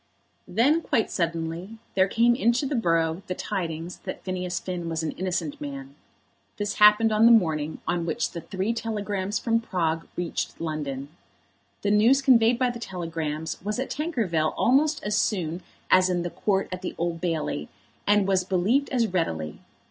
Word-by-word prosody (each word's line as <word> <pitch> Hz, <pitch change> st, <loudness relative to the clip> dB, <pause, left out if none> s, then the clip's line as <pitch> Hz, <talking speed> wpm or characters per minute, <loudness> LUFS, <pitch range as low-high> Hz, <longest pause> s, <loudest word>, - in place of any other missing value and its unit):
Then, 270 Hz, -, +3 dB
quite 225 Hz, -8 st, 0 dB
suddenly, 170 Hz, +4 st, -3 dB, 0.2 s
there 190 Hz, 0 st, +4 dB
came 235 Hz, +4 st, +3 dB
into 240 Hz, +2 st, +2 dB
the 280 Hz, -, -2 dB
borough 165 Hz, -6 st, +1 dB
the 180 Hz, -, -3 dB
tidings 170 Hz, -4 st, -4 dB
that -, -, -7 dB
Phineas 180 Hz, -1 st, -3 dB
Finn 175 Hz, -1 st, -4 dB
was 165 Hz, 0 st, -2 dB
an 155 Hz, -, -1 dB
innocent 175 Hz, -5 st, -3 dB
man. 140 Hz, -1 st, -6 dB, 0.6 s
This 205 Hz, 0 st, -3 dB
happened 210 Hz, +1 st, +7 dB
on 215 Hz, +2 st, +5 dB
the -, -, +7 dB
morning 160 Hz, -8 st, +2 dB
on 170 Hz, 0 st, -1 dB
which 230 Hz, +7 st, -1 dB
the 170 Hz, -, -6 dB
three 190 Hz, +6 st, -2 dB
telegrams 205 Hz, -3 st, -2 dB
from 230 Hz, -1 st, +1 dB
Prague 165 Hz, -6 st, -1 dB
reached 175 Hz, -1 st, -3 dB
London. 145 Hz, -4 st, -4 dB, 0.7 s
The 205 Hz, -, +2 dB
news 225 Hz, +6 st, +5 dB
conveyed 235 Hz, -3 st, +5 dB
by 250 Hz, -1 st, +1 dB
the 240 Hz, -, -8 dB
telegrams 165 Hz, -6 st, -4 dB
was 210 Hz, +3 st, -2 dB
at 260 Hz, -, -3 dB
Tankerville 220 Hz, -, -1 dB
almost 295 Hz, +5 st, +3 dB
as 210 Hz, 0 st, 0 dB
soon 180 Hz, -5 st, 0 dB, 0.3 s
as 185 Hz, 0 st, +6 dB
in 175 Hz, -1 st, 0 dB
the 175 Hz, -, -4 dB
Court 195 Hz, -2 st, 0 dB
at 185 Hz, 0 st, -5 dB
the 185 Hz, -, -5 dB
Old 170 Hz, 0 st, -2 dB
Bailey, 160 Hz, -, -2 dB, 0.4 s
and 205 Hz, -1 st, +4 dB
was 190 Hz, -2 st, +2 dB
believed 195 Hz, +10 st, +1 dB
as 245 Hz, -3 st, +2 dB
readily. 80 Hz, -, -2 dB
185 Hz, 170 wpm, -26 LUFS, 165-225 Hz, 0.7 s, happened